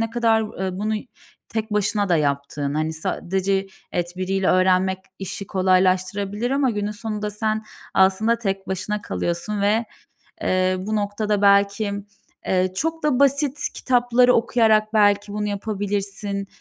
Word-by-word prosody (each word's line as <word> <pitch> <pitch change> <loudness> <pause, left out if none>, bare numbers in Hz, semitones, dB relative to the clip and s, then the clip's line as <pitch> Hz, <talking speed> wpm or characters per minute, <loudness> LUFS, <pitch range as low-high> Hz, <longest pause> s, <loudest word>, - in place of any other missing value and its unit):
ne 225 0 -1
kadar, 225 -4 +1
eee, 185 -1 -3
bunu 215 +2 -1 0.5
tek 220 -1 -3
başına 205 0 +1
da 175 - +4
yaptığın. 140 -1 -1
Hani 155 +1 -1
sadece 190 +4 -1 0.3
evet 175 0 -2
biriyle 190 +1 0
öğrenmek 185 0 +3 0.2
işi 195 +1 -6
kolaylaştırabilir 190 +4 +1
ama 270 -1 +2
günün 205 -1 -2
sonunda 210 0 -4
sen 215 +1 -2 0.3
aslında 195 +5 +3
tek 195 -3 -3
başına 205 +3 -3
kalıyorsun 175 +5 -3
ve, 215 +3 +2 0.6
eee, 185 0 +2
bu 210 +4 -2
noktada 205 0 -1
belki, 200 +1 +3 0.5
eee, 185 0 +2
çok 325 +8 -2
da 290 -4 +2
basit 280 +1 +3 0.2
kitapları 245 0 +3
okuyarak 220 -2 +3
belki 205 -1 +3
bunu 210 0 -2
yapabilirsin. 200 -1 -3
205 Hz, 135 wpm, -22 LUFS, 190-220 Hz, 0.6 s, da